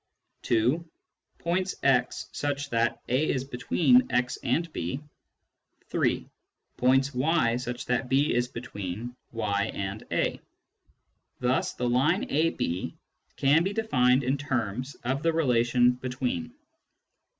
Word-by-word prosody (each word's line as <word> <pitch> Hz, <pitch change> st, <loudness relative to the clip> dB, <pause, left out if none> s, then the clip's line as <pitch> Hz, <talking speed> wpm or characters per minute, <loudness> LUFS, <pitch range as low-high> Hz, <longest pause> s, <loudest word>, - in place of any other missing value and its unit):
(2) 120 Hz, +8 st, +2 dB, 0.5 s
Points 185 Hz, +2 st, -1 dB
x 125 Hz, -2 st, +2 dB
such 145 Hz, -1 st, -3 dB
that 115 Hz, 0 st, +1 dB
a 130 Hz, +6 st, +1 dB
is 130 Hz, -, 0 dB
between 175 Hz, -, +3 dB
x 125 Hz, +1 st, 0 dB
and 165 Hz, -1 st, 0 dB
b. 85 Hz, +11 st, -3 dB, 0.9 s
(3) -, -, 0 dB, 0.5 s
Points 135 Hz, +2 st, +3 dB
y 130 Hz, -2 st, +2 dB
such 125 Hz, -1 st, -5 dB
that 125 Hz, +1 st, -1 dB
b 140 Hz, +3 st, +3 dB
is 120 Hz, 0 st, +1 dB
between 115 Hz, 0 st, -6 dB, 0.2 s
y 105 Hz, -3 st, -1 dB
and 100 Hz, +2 st, -4 dB
a. -, -, 0 dB, 1.0 s
Thus 125 Hz, +1 st, +1 dB
the 125 Hz, -, -1 dB
line 135 Hz, +10 st, +2 dB
(ab) 160 Hz, +4 st, +1 dB, 0.8 s
can 145 Hz, +4 st, +4 dB
be 195 Hz, +3 st, -1 dB
defined 130 Hz, -, +3 dB
in 130 Hz, +3 st, 0 dB
terms 130 Hz, -1 st, -2 dB
of 130 Hz, +3 st, -1 dB
the 165 Hz, +1 st, +2 dB
relation 125 Hz, -5 st, +3 dB
" 125 Hz, -, -21 dB
between." 240 Hz, -, -2 dB
130 Hz, 125 wpm, -27 LUFS, 120-150 Hz, 1.0 s, can